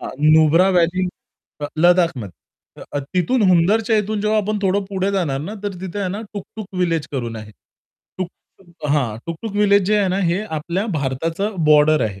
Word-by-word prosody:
हां, - - -6 0.3
नुब्रा 160 +4 +5
व्हॅली 180 +2 +2 0.8
लद्दाखमध्ये 165 - +2 0.5
अ, 145 - -1 0.2
तिथून 210 +7 +2
हुंदरच्या 210 +6 +3
इथून 210 0 -2
जेव्हा 215 +1 +1
आपण 210 0 -1
थोडं 195 +1 +1
पुढे 195 0 -1
जाणार 160 -9 0
ना, 195 +8 -6
तर 205 - -3
तिथे 190 +1 -5
आहे 190 -2 -1
ना 200 +4 -4
टुक-टुक 210 0 -8
व्हिलेज 165 -4 0
करून 120 -4 -3
आहे. 110 -1 -9 0.7
टुक-टुक 175 -2 -9
हां, 125 -8 0
टुकटुक 170 +6 -5
व्हिलेज 205 -1 +4
जे 210 +1 +3
आहे 195 -2 +2
ना, 185 - 0
हे 180 +4 0 0.2
आपल्या 175 +7 -3
भारताचं 165 +9 -2
बॉर्डर 150 0 +5
आहे. 100 -3 -5
180 Hz, 165 wpm, -20 LUFS, 155-200 Hz, 0.8 s, नुब्रा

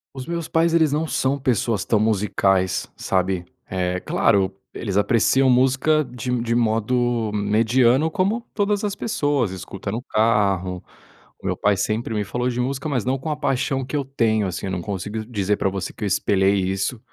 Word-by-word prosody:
Os 130 - -6
meus 170 -1 -3
pais, 165 0 +2
eles 160 -3 +4
não 155 +2 0
são 135 0 0
pessoas 115 -5 0
tão 110 0 +2
musicais, 95 -3 +1
sabe? 95 -1 -1 0.2
É 90 -1 -1
claro, 95 0 +2 0.2
eles 100 -3 -3
apreciam 130 +4 +3
música 130 +5 +3
de 125 0 -5
de 115 0 0
modo 115 0 +1
mediano, 115 +7 +3
como 205 +7 0
todas 205 0 0
as 205 -1 -1
pessoas, 145 - 0
escuta 95 +1 -6
no 115 +3 -3
carro. 100 -6 +1 0.6
O - - -14
meu - - 0
pai 100 -1 +2
sempre 110 +3 -1
me 105 - 0
falou 125 +5 -2
de 125 0 -3
música, 135 +4 -2
mas 125 -5 -1
não 130 +1 0
com 155 - -5
a 150 - 0
paixão 135 -1 -1
que 150 - -5
eu 140 - 0
tenho, 110 -6 +1
assim. 90 +2 -4
Eu - - -3
não 90 -2 -2
consigo 105 +3 -4
dizer 105 -3 0
pra 95 - +1
você 95 -2 -4
que 110 - -8
eu - - 0
espelhei 100 0 +2
isso 95 +5 -1
115 Hz, 185 wpm, -22 LUFS, 100-135 Hz, 0.6 s, eles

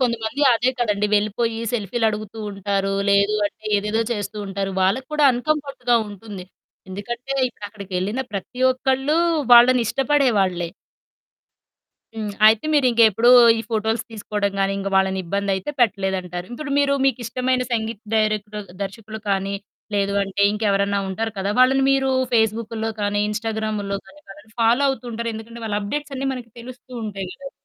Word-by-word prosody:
కొంతమంది 235 +3 -1
అదే 235 +2 +2
కదండీ 210 -3 +1
వెళ్ళిపోయి 220 +2 0
సెల్ఫీ‌లు 225 0 0
అడుగుతూ 215 0 -5
ఉంటారు. 195 0 -1 0.2
లేదు 200 +1 +3
అంటే 205 - -12
ఏదేదో 210 +3 0
చేస్తూ 210 0 -5
ఉంటారు. 195 0 -3
వాళ్ళకి 240 +8 +1
కూడా 300 -1 +2
అన్‌కమ్‌ఫర్ట్‌గా 270 -2 0
ఉంటుంది. 205 -2 -9 0.4
ఎందుకంటే 235 +7 -5 0.2
ఇప్పుడక్కడికెళ్ళిన 200 +1 -4
ప్రతి 205 +6 -6
ఒక్కళ్ళూ 265 +4 0 0.3
వాళ్ళని 245 +1 +8
ఇష్టపడేవాళ్ళే. 230 -11 +1 1.4
హ్మ్. 215 -2 -4 0.2
అయితే 220 +3 +5
మీరింకేప్పుడూ 235 -4 +4 0.3
ఈ - - -1
ఫోటోస్ 220 +1 0
తీసుకోవడం 205 -2 -2
గాని, 195 0 +1
ఇంకా 195 0 -3
వాళ్ళని 190 0 +2
ఇబ్బంది 200 +3 -2
అయితే 190 +10 -4
పెట్టలేదంటారు. 190 -5 0
ఇప్పుడు 290 +3 -6
మీరు 280 -1 +3
మీకిష్టమైన 255 0 0
సంగీత 225 -2 -2 0.2
డైరెక్టర్ 210 -1 -1 0.2
దర్శకులు 215 +2 -7
కానీ, 195 0 0 0.4
లేదు 200 0 +1
అంటే 195 +1 -2
ఇంకెవరైనా 200 -1 +1
ఉంటారు 225 +4 -3
కదా! 195 +1 -1
వాళ్ళని 265 +1 +5
మీరూ 270 -1 +2 0.2
ఫేసుబుక్కుల్లో 225 0 0
కానీ, 205 0 0
ఇన్‌స్టాగ్రాముల్లో 215 -2 -2
కానీ 300 - -17
వాళ్ళని 205 +3 -14
ఫాలో 230 +4 +4
అవుతుంటరు. 235 -3 -4
ఎందుకంటే 230 +2 -9
వాళ్ళ 205 -2 -1
అప్డేట్స్ 290 +7 -4
అన్నీ 270 +1 -2
మనకు 240 -2 -9
తెలుస్తూ 255 +1 -12
ఉంటాయి 195 -3 -5
గదా! 275 0 -9
220 Hz, 135 wpm, -22 LUFS, 200-245 Hz, 1.4 s, వాళ్ళని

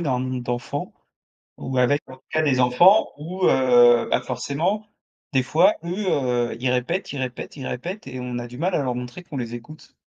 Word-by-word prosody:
dans 140 -7 0
un - - -2
monde 130 -1 -3
d'enfants? 120 0 -4 0.7
Ou 130 0 -4
avec, 140 +4 +3
en 130 - -10
tout - - -32
cas, 155 - +2
des 140 -4 +2
enfants 175 - +5
où, 180 +5 -3
heu, 120 -2 +5
bah, - - +2
forcément 150 - -2 0.5
des 130 -1 +3
fois 160 +9 +4
eux, 185 +4 -3
heu, 120 -4 0
ils 125 0 0
répètent, 125 +10 -1
ils 140 - -5
répètent, 125 -2 -5
ils 135 -3 -6
répètent 175 +11 -5
et 130 -1 -6
on 125 -1 -4
a 120 - -6
du 120 +1 -11
mal 175 +5 -1
à - - +2
leur 125 -2 -2
montrer 125 +8 -7
qu'on 145 -5 -8
les 120 -2 -4
écoute? 150 +6 -11
130 Hz, 215 wpm, -23 LUFS, 125-155 Hz, 0.7 s, enfants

